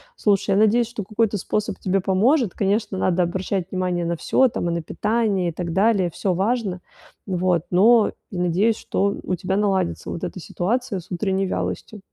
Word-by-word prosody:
Слушай, 200 - +1
я - - +3
надеюсь, 220 +3 +4
что 235 -2 -6
какой-то 215 +1 0
способ 210 +3 -2
тебе 195 0 +1
поможет. 205 - +2
Конечно, 205 0 0
надо 185 -1 +2
обращать 185 +1 -2
внимание 180 -2 -1
на 170 0 -1
всё 260 +10 +3
там: 175 -7 -2
и - - -1
на 170 - -2
питание, 210 0 0
и - - -4
так 170 0 -4
далее- 195 -1 +3
всё 190 - -1
важно, 200 0 -1 0.5
н 190 - -2
вот. 180 -2 +1
Но 215 +5 +5 0.2
я 185 - -4
надеюсь, 195 +6 +2
что 200 0 -1
у 185 - -1
тебя 185 +2 -2
наладится 195 -4 0
вот 170 - -5
эта 180 +1 -4
ситуация 210 +4 -2
с 180 - -21
утренней 190 +1 0
вялостью. 210 +3 -4
190 Hz, 190 wpm, -22 LUFS, 180-215 Hz, 0.5 s, Но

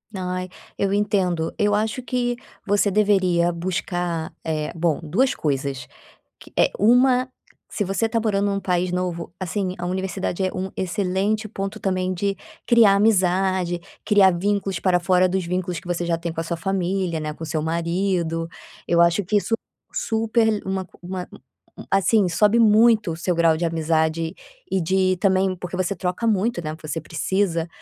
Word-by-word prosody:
Ai, 185 0 -3 0.3
eu 200 0 0
entendo, 190 -5 0
eu 205 0 +3
acho 220 +5 -1
que 245 -1 -1 0.3
você 205 0 +2
deveria 190 -4 +3
buscar 175 -1 -3
eh, 155 -2 -2
bom, 165 -2 0
2 225 - +1
coisas, 135 -3 -2 0.6
que - - -15
é - - +4
uma, 250 +4 +4 0.4
se 205 - -2
você 195 +4 0
tá 230 +1 0
morando 205 -2 +1
num 200 - 0
país 180 -1 0
novo, 180 -2 -3
assim, 185 0 -2
a 175 - -3
universidade 190 0 -2
é 185 - -1
um 190 0 -4
excelente 195 +4 -1
ponto 195 +1 -5
também 185 -2 -1
de 195 +2 -1 0.3
criar 230 -4 +6
amizade, 185 -3 +2 0.2
criar 205 -3 +5
vínculos 195 0 -1
para 180 -2 +3
fora 180 +1 +3
dos 185 0 -1
vínculos 180 -1 -2
que - - -12
você 175 0 -2
já 170 -1 0
tem 170 0 -4
com 165 - -4
a - - -3
sua 170 +1 -3
família, 185 -1 -1
né, 155 0 -3
com 160 - -8
seu 155 0 -2
marido. 170 0 -1 0.4
Eu 170 0 +3
acho 170 +3 +3
que 210 +4 0
isso 225 +3 +1 0.4
super 225 - +1
le 210 -1 -2
uma 190 0 -2 0.2
uma 180 0 -6 0.6
assim, 195 0 +3
sobe 210 +6 +3
muito 220 -4 +5
o - - -6
seu 175 0 -1
grau 165 -1 +4
de 170 - -2
amizade 160 0 0 0.3
e 190 - 0
de 185 +2 +2
também 190 -1 +2
porque 180 0 -6
você 185 +1 -1
troca 180 +4 -2
muito, 215 -2 +1
né. 155 0 -4
Você 155 +1 -3
precisa, 165 +2 -1
185 Hz, 170 wpm, -23 LUFS, 170-205 Hz, 0.6 s, criar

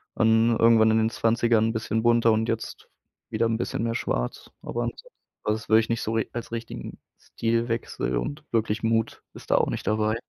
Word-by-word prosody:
und 115 +1 +3
irgendwann 115 -1 +5
in 110 - +3
den 110 0 +2
20ern 115 -1 +2
'n - - -2
bisschen 110 0 -1
bunter 115 -1 +4
und 110 +1 +1
jetzt 115 0 -4 0.4
wieder 115 +1 0
'n 115 -1 0
bisschen 115 - -3
mehr 115 0 -1
Schwarz, - - -3
aber 120 - -3
ansonsten, 120 - -6 0.4
also, 105 - +1
das 110 - -12
würde 110 - +6
ich 110 - -6
nicht 115 0 -1
so 110 - -2
ri 110 -1 0
als 120 -1 -6
richtigen 115 0 -6 0.2
Stilwechsel 115 - -2
und 145 - -4
wirklich 110 -1 0
Mut 115 0 0
ist - - -9
da - - +5
auch - - +2
nicht - - -4
dabei. 110 0 +1
115 Hz, 205 wpm, -25 LUFS, 110-115 Hz, 0.4 s, würde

